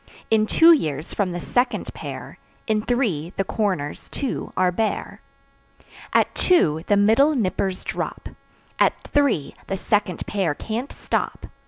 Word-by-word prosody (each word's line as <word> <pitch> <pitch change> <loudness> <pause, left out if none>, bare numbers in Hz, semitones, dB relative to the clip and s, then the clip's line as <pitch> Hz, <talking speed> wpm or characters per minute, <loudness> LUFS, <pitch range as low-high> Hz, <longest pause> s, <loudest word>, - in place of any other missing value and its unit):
In 215 -1 +4
two 330 +8 +7
years, 155 - +1
from 195 -3 0
the 175 - -4
second 245 +8 -1
pair; - - -8 0.3
In 215 -1 +1
three, 210 - -1
the 195 - +2
corners, 185 -8 -2
too, 275 -3 -4
are 185 -1 +3
bare. 220 +4 -2 0.9
At - - +3
two 160 - +3
the 205 - +4
middle 225 +9 +4
"nippers" 190 -4 -1
drop; - - -4 0.5
At - - +3
three, 275 - +1
the 195 - -2
second 205 -3 0
pair 190 -8 -1
can't 230 - -4
stop. - - -3
205 Hz, 140 wpm, -23 LUFS, 180-240 Hz, 0.9 s, two